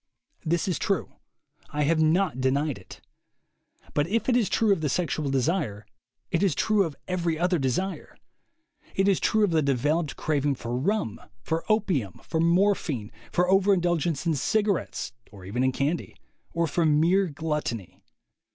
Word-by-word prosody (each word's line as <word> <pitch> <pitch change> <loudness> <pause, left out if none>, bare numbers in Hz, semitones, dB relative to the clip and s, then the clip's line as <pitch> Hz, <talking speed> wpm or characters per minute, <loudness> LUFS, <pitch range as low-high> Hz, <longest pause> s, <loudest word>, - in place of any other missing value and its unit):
This 170 +2 0
is 180 -5 -1
true. - - -1 0.6
I 150 0 -1
have 160 +2 +2
not 160 -4 +2
denied 140 0 0
it. 90 - -14 0.9
But 145 +2 +1
if 225 +5 0
it 250 - +3
is 235 -5 +2
true 220 -3 +3
of 190 - -3
the 150 - 0
sexual 155 -2 -1
desire, 135 - -1 0.5
it 165 - +1
is 190 -8 +2
true 215 -3 +2
of 155 -4 -6
every 175 -3 -1
other 175 +1 +1
desire. 145 +9 -2 0.8
It 195 +1 +2
is 195 -2 +3
true 220 -1 +2
of 200 - +2
the 160 -1 +3
developed 145 +3 0
craving 145 -2 0
for 120 -1 -4
rum, 140 - -1 0.2
for 165 0 -1
opium, 185 - 0
for 160 - -2
morphine, 170 - +1 0.2
for 180 +1 +2
overindulgence 175 -5 +2
in 165 - +2
cig 205 - +1
arettes 200 -5 -2 0.2
or 95 -3 -12
even 120 +7 -1
in 130 - +3
candy, 145 +6 -2 0.4
or 170 0 +1
for 165 +2 0
mere 165 +5 +3
gluttony. 145 - -4
160 Hz, 160 wpm, -26 LUFS, 140-185 Hz, 0.9 s, it